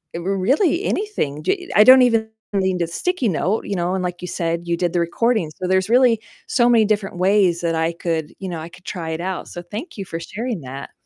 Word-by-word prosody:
r 170 - -4
really 265 - +1
anything, 155 - -2
j 365 -2 -1
I 210 - +8
don't 260 +2 +9
even 225 -2 +2 0.2
need 190 -2 0
a 165 - +1
sticky 345 - -1
note, 190 +5 0
you 200 - -3
know, 175 0 -1
and 185 - -1
like 175 0 -4
you 180 - -5
said, 165 0 -2
you 170 0 -1
did 175 0 -1
the 175 - +2
recording, 190 -1 0
so 185 - -2
there's 190 +2 +1
really 240 -2 +4 0.3
so 240 -1 +3
many 230 -2 +5
different 205 -3 -1
ways 185 -2 +3
that 165 -1 0
I 160 +1 +1
could 165 -2 -3
you 195 - -5
know, 170 -2 -4
I 165 - -8
could 180 +2 -17
try 165 -3 -5
it 160 - -3
out, 185 0 -4
so 175 - -7
thank 210 - -8
you 195 - -5
for 165 - -5
sharing 220 +2 -4
that. 135 +1 -8
190 Hz, 240 wpm, -21 LUFS, 170-225 Hz, 0.3 s, don't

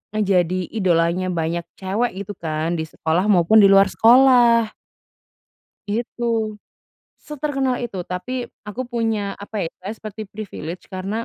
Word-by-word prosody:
menjadi 185 -4 +1
idolanya 180 -3 +1
banyak 170 -1 -2 0.2
cewek 200 +6 -1
gitu 200 - -8
kan 160 +1 -2
di 160 - -3
sekolah 165 +5 -1
maupun 200 +1 +5
di 200 - +8
luar 195 0 +6
sekolah. 235 -2 +5 1.2
Gitu, 235 +2 -3 0.9
seterkenal 275 -3 -2
itu. 240 -5 -5
Tapi 180 +8 -5 0.4
aku 230 +5 -4
punya, 225 -4 -2
apa 205 +2 -8
ya, - - -3 0.3
seperti 215 -1 -8
privilege 185 -5 -7
karena 195 +5 -3
200 Hz, 125 wpm, -21 LUFS, 180-230 Hz, 1.2 s, di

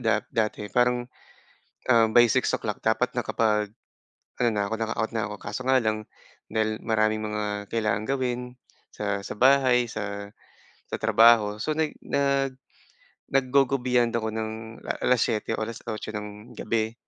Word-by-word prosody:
da - - +3
dati 105 -2 -1
parang, 120 0 +2 0.8
um, 115 -2 +6
by 120 0 +8
6:00 110 -4 0
dapat 110 +3 +2
na 120 - +1
kapag 105 -2 +1 0.7
ano 120 - +4
na 100 -1 0
ko, 110 - -3
naka-out 115 0 -2
na 115 0 0
ako 105 - -5
kaso 105 +4 -5
nga 130 - +5
lang, 110 -1 -1 0.4
dahil 110 0 0
maraming 110 -1 +1
mga 105 -1 -3
kailangang 110 -1 0
gawin 125 -1 -1 0.5
sa 100 -1 -2
sa 100 - -6
bahay, 130 -1 +5
sa 100 -1 -5 0.6
sa - - -3
trabaho. 110 -2 +5
So, 155 +5 0
nag 155 -2 0
nag 140 -2 0 0.7
nag-go, 135 0 +3
go 135 +2 0
beyond 120 -2 +2
ako 110 -1 -1
ng, 110 0 -5
la - - -1
7:00 115 -3 +1
o - - -3
8:00 110 -1 -6
ng 105 +3 -8
gabi. 110 0 -1
110 Hz, 150 wpm, -26 LUFS, 105-125 Hz, 0.8 s, by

